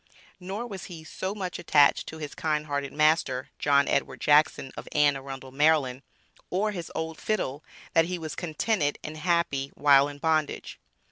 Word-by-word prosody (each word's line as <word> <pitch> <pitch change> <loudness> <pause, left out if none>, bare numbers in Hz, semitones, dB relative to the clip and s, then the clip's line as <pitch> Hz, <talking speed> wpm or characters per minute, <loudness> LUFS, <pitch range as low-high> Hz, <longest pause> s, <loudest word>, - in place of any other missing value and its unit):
Nor 195 +6 -5
was 195 -6 -7
he 170 -4 -9
so 190 +5 -5
much 185 -3 -4
attached 145 -4 +4
to 160 - -7
his 150 -2 -6
"kind 155 -1 -1
hearted 140 -2 -3
master," 150 -4 +1
John 140 -1 +3
Edward - - 0
Jackson, 150 -2 +3
of - - -8
Anne 145 -1 +4
Arundel, 135 -1 -8
Md., 140 -3 +2 0.5
or 205 +4 0
his 175 -5 -6
old 160 0 -4
fiddle, 160 -9 -2 0.3
that 165 - +5
he 180 +1 -3
was 160 -2 -6
contented 160 -1 -1
and 155 - -6
happy 170 -4 0
while 140 -1 +5
in 145 0 -8
bondage. 155 0 -1
155 Hz, 165 wpm, -27 LUFS, 140-170 Hz, 0.5 s, that